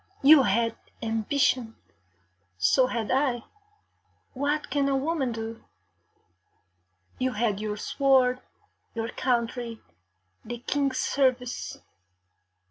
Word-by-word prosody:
You 290 +1 +9
had 230 0 +1 0.3
ambition, 225 +1 0 0.8
so 255 - +4
had 230 -4 -2
I. 255 -3 +1 0.9
What 290 +3 -1
can 280 -1 +1
a 270 - +2
woman 275 -2 -1
do? 225 0 -6 1.6
You 255 0 0
had 210 -2 0
your 210 -1 -3
sword, 255 +1 +2 0.5
your 225 0 -2
country, 235 -2 -1 0.6
the 240 +2 -5
King's 275 +2 -1
service. 255 -3 0
250 Hz, 95 wpm, -27 LUFS, 230-270 Hz, 1.6 s, You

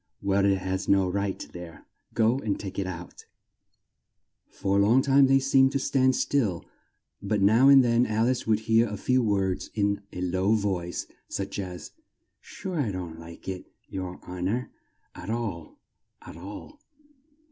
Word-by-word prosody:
"Well, 100 0 +1
it 100 -1 +3
has 95 +1 -3
no 95 -1 +4
right 100 +1 -2
there; 85 -2 -10 0.3
go 115 +3 +3
and 105 -7 -2
take 100 -1 -6
it 95 - -2
out!" 90 -1 -8 1.2
For 100 0 0
a - - +5
long 115 +6 +4
time 140 0 +5
they 135 0 +5
seemed 135 0 +3
to - - +2
stand 130 -1 +2
still, 110 -14 0 0.6
but 105 +1 -1
now 110 +7 +5
and 135 -1 +8
then 120 0 +3
Al 110 +1 +1
ice 130 0 0
could 110 -1 +2
hear 115 +1 +3
a 105 -1 -5
few 130 +5 +2
words 100 -4 0
in 100 -1 0
a 90 - -6
low 95 +3 +1
voice, 95 -5 -2 0.2
such 100 +1 -4
as, 90 -2 -6 0.5
"Sure 185 -4 -6
I 130 -7 0
don't 85 -3 -6
like 85 0 -12
it, 95 -1 -6 0.2
yer 95 -1 -5
hon 90 +1 -3
or, 125 +4 -2 0.4
at 95 - -9
all, 110 -8 -4 0.5
at - - -10
all!" 105 - -10
100 Hz, 170 wpm, -27 LUFS, 95-120 Hz, 1.2 s, and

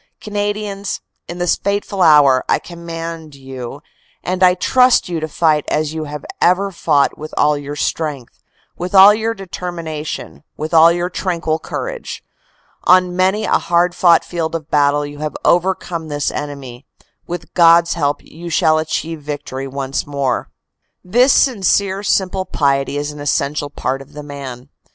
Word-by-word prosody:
"Canadians, 205 -1 -3 0.3
in 175 - -7
this 175 -1 +1
fateful 200 -1 -2
hour, 145 -6 +6
I - - +4
command 165 -2 -8
you 135 0 -8 0.4
and 185 +1 -2
I 180 -1 +6
trust 250 +6 +3
you 170 -2 -3
to 155 - -3
fight 155 -1 +1
as 155 0 -1
you 160 -1 -4
have 150 -1 -7 0.2
ever 195 +3 +3
fought 150 -5 +1
with 155 +1 -8
all 150 0 +3
your 145 0 -6
strength, 150 -4 -3 0.3
with 180 +2 -4
all 195 +2 +9
your 225 +1 -2
determination, 170 -7 -6
with 155 +2 -5
all 165 +1 +7
your 175 +1 -2
tranquil 170 -4 -2
courage. - - -6 0.6
On 180 0 +4
many 190 +4 +1
a - - +2
hard 175 +1 +1
fought 170 -2 +4
field 165 -2 -3
of 160 -2 -6
battle 145 0 +2
you 145 0 -9
have 155 0 -4
overcome 175 -2 +1
this 145 -1 -2
enemy. 140 -3 -7 0.4
With 175 -1 -6
God 170 -1 +6
s 170 +1 -3
help 145 -3 -1
you 170 +2 -10
shall 155 -1 +3
achieve 160 0 -3
victory 145 -2 -5
once 135 0 -3
more. 140 -3 -2 0.5
This 245 +9 +4
sincere 200 -6 +2
simple 190 -2 0
piety 140 -5 0
is 145 +1 -3
an 150 - -11
essential 145 0 -1
part 135 -1 -3
of 135 - -15
the 150 - -8
man. 135 -3 -8
165 Hz, 160 wpm, -17 LUFS, 145-180 Hz, 0.6 s, all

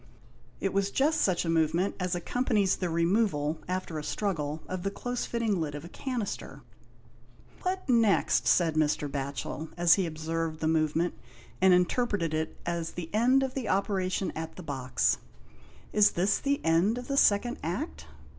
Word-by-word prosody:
It 195 - -1
was 200 0 +1
just 290 +8 +2
such 180 -2 +1
a - - -3
movement 165 +3 +1
as 180 -1 -1
accompanies 210 +1 +1
the 180 - -2
removal, 170 -3 +1
after 180 -3 -3
a - - -6
struggle, 155 -6 -2
of 185 -1 -4
the 195 - -1
close 245 +4 -4
fitting 225 -6 0
lid 150 -2 -3
of 145 +2 -7
a - - -9
canister. 245 -1 -5 1.0
"What 375 0 -2
next?" 230 -5 +3
said 165 -3 +4
Mr. 150 -1 +1
Batchel, 140 +3 -4
as 175 -1 +6
he 180 - -1
observed 160 0 -3
the 160 - 0
movement, 160 +2 +1 0.5
and 190 0 +6
interpreted 180 -1 +2
it 155 0 -2
as 170 -1 -2
the 170 0 -7
end 250 +5 +4
of 265 -1 -2
the 260 -4 -3
operation 190 -1 0
at 160 0 -5
the 180 - -9
box. 130 -6 0 0.4
" - - -25
Is 210 -1 +5
this 190 +4 +2
the 280 0 0
end 170 +8 +3
of 245 0 -6
the 275 - -1
second 240 -1 +3
Act 80 - -4
175 Hz, 170 wpm, -29 LUFS, 160-210 Hz, 1.0 s, as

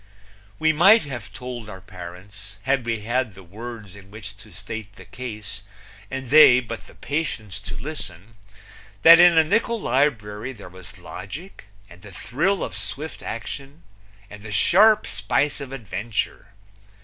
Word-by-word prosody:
We 160 0 +3
might 195 +9 +7
have 125 -7 -7
told 125 -3 -7
our 95 -2 -8
parents, 95 +3 -11
had 130 -1 0
we 115 -2 -1
had 120 -1 -1
the 95 - -12
words 110 +1 -9
in 100 -1 -14
which 105 -1 -9
to 105 0 -15
state 105 +3 -7
the - - -13
case 105 -6 -8 0.5
and 130 -2 -6
they 145 -5 +9
but 115 -2 -7
the - - -16
patience 125 - -3
to 100 0 -8
listen, 110 - -6 0.7
that 165 +1 +10
in 175 -1 +7
a 160 - +8
nickul 225 +7 +1
librury 125 - 0
there 100 - -11
was 95 0 -12
logic 145 - -9 0.2
and 90 0 -16
the 105 0 -12
thrill 165 - -1
of 90 - -5
swift 105 +11 -5
action 140 -9 -7 0.4
and 105 0 -12
the 105 0 -8
sharp 205 - +5
spice 115 +9 0
of 135 -2 -7
adventure. 110 -3 -4
115 Hz, 155 wpm, -23 LUFS, 100-140 Hz, 0.7 s, that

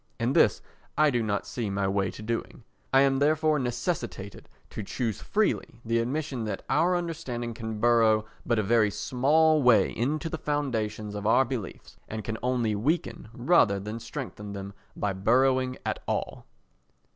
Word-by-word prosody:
And - - 0
this - - +4 0.3
I 155 -1 +5
do 120 -2 +1
not 105 -2 -1
see 115 -4 -3
my 100 0 -1
way 95 -1 0
to 110 - -9
doing. 115 +1 -4 0.3
I 135 - +6
am 135 -1 +3
therefore 155 +1 +2
necessitated 120 - -4 0.2
to - - -5
choose 110 +1 -3
freely 205 - -1
the 115 +1 +1
admission 130 +1 -2
that 105 - -4
our 180 +1 +3
understanding 130 -9 -3
can 110 -2 -5
burrow 110 -2 +4 0.2
but 120 - 0
a 110 - +2
very 110 +1 +3
small 150 +8 +2
way 125 -3 +5
into 150 +7 -1
the 160 0 -4
foundations 110 -8 -2
of 105 0 -3
our 130 +4 +5
beliefs, 120 -6 -6
and 110 0 -5
can 110 0 -4
only 125 -3 0
weaken 140 +5 -1
rather 120 - +3
than 105 +3 -5
strengthen 110 -7 -7
them 100 0 -7 0.2
by 100 -1 -1
burrowing 130 +6 +2
at - - -2
all. - - -3
120 Hz, 165 wpm, -27 LUFS, 110-140 Hz, 0.3 s, I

